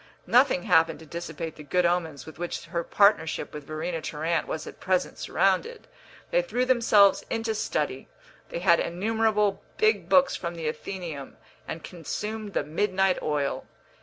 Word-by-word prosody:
Nothing 245 -7 +4
happened 165 -4 +3
to 160 - -13
dissipate 165 0 -6
the 150 - -9
good 180 +5 +1
omens 165 -5 -1
with 160 -1 -12
which 175 0 -4
her 170 -2 -3
partnership 200 -6 +2
with 150 -2 -8
Verena 155 +2 -3
Tarrant 160 +2 -1
was 155 - -4
at - - -10
present 185 -1 0
surrounded. 195 - 0 0.4
They - - +4
threw 255 - -1
themselves 225 -6 +5
into 225 -1 -1
study; 150 -10 -2 0.4
they - - -4
had 170 -1 +4
innumerable 210 +2 +1 0.2
big 435 0 +2
books 275 -1 +5
from 170 -1 -4
the 165 -1 -6
Athenæum, 155 -4 -5 0.3
and 160 - -6
consumed 210 +4 -5
the - - 0
midnight 190 +3 +1
oil. 145 -2 -1
175 Hz, 155 wpm, -27 LUFS, 160-210 Hz, 0.4 s, themselves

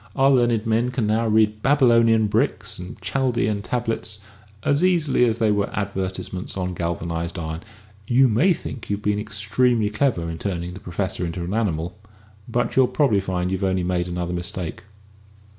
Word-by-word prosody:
Our 135 0 +4
learned 120 -4 +2
men 115 +2 +1
can 125 -3 -1
now 110 +2 +1
read 105 -1 +2
Babylonian 115 -5 +4
bricks 105 - -1
and 90 +1 -8
Chaldean 120 -6 0
tablets 115 -2 -3 0.5
as 145 +4 +2
easily 165 -9 +3
as 115 -2 +1
if - - -12
they 110 -1 +4
were 100 -1 +1
advertisements 95 -2 -3
on 90 -1 -2
galvanised 85 0 -3
iron. 80 0 -4 0.5
You 130 +2 +5
may 125 - +3
think 130 -6 -7
you've 100 +1 -2
been 105 0 +1
extremely 110 +2 +1
clever 105 -7 0
in 80 0 -5
turning 90 -3 -3
the 95 - -8
Professor 95 0 -3
into 85 0 -3
an 90 +3 -4
animal, 90 -7 -1 0.5
but 120 +1 -1
you'll 130 -1 +5
probably 120 -10 +2
find 90 -1 -2
you've 95 +1 -2
only 95 -1 +1
made 90 0 0
another 90 0 -3
mistake." 90 -1 -4
105 Hz, 170 wpm, -23 LUFS, 90-120 Hz, 0.5 s, You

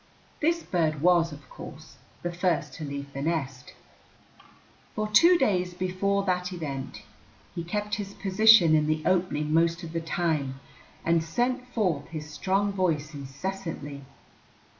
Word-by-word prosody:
This 335 +2 +1
bird 155 -4 0
was, 170 -2 +4
of 145 -1 -11
course, - - -11 0.3
the 175 - -2
first 170 -5 0
to 155 - -7
leave 140 -1 -6
the 140 - -4
nest. 135 -5 -3 1.2
For 215 0 -1
two 335 +13 +6
days 180 - +1
before 185 +2 0
that 180 -1 0
event 145 -7 -5 0.5
he 170 - -4
kept 210 +4 -3
his 200 0 -8
position 195 -3 +6
in 155 -1 +3
the 155 0 0
opening 165 -5 +1
most 170 +2 +2
of 165 -1 -7
the 165 - -1
time 155 -5 -1 0.5
and 165 -1 +3
sent 250 +8 -1
forth 185 - -1
his 155 -2 -7
strong 195 +6 0
voice 160 -5 0
incessantly. 145 +1 -6
170 Hz, 140 wpm, -27 LUFS, 150-195 Hz, 1.2 s, two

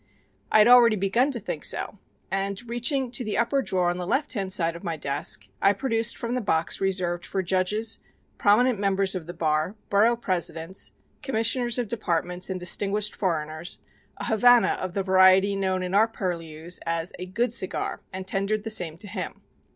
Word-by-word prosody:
I - - +5
had 215 +1 +6
already 240 -2 +7
begun 210 +7 +1
to 255 -4 -3
think 160 -6 -5
so, 205 - -1 0.3
and 195 +4 -2
reaching 240 +2 -1
to 245 +1 -1
the 215 - -2
upper 235 +4 +1
drawer 185 -7 0
on 175 - -4
the 180 - -4
left 275 +8 0
hand 195 -5 -3
side 170 -4 +2
of 170 - -10
my 165 -3 -3
desk, 145 +1 -1
I 200 - +5
produced 230 -2 0
from 235 0 -4
the 250 - -1
box 165 -5 -1
reserved 185 -3 0
for 190 - -3
judges, 190 +5 0 0.4
prominent 220 +2 +3
members 195 -1 +1
of 180 -4 -5
the 175 - -6
bar, 155 +3 0 0.2
borough 220 +4 +4
presidents, 180 -4 -2 0.3
commissioners 240 0 +1
of 245 -2 -1
departments 180 -4 -1
and 185 -1 -3
distinguished 200 +4 +1
foreigners, 155 -2 -3 0.4
a - - -5
Havana 240 +2 +5
of 185 -1 -5
the 195 - 0
variety 190 +1 +5
known 190 -1 -1
in 180 0 -4
our 215 +3 +5
purlieus 170 -5 -5
as 165 +1 -1
a 180 - -6
"good 230 +5 -1
cigar," 190 -6 -1
and 190 0 -6
tendered 200 +3 -1
the 225 - -2
same 170 -6 +1
to 205 - -4
him. 205 - -6
195 Hz, 185 wpm, -25 LUFS, 180-225 Hz, 0.4 s, already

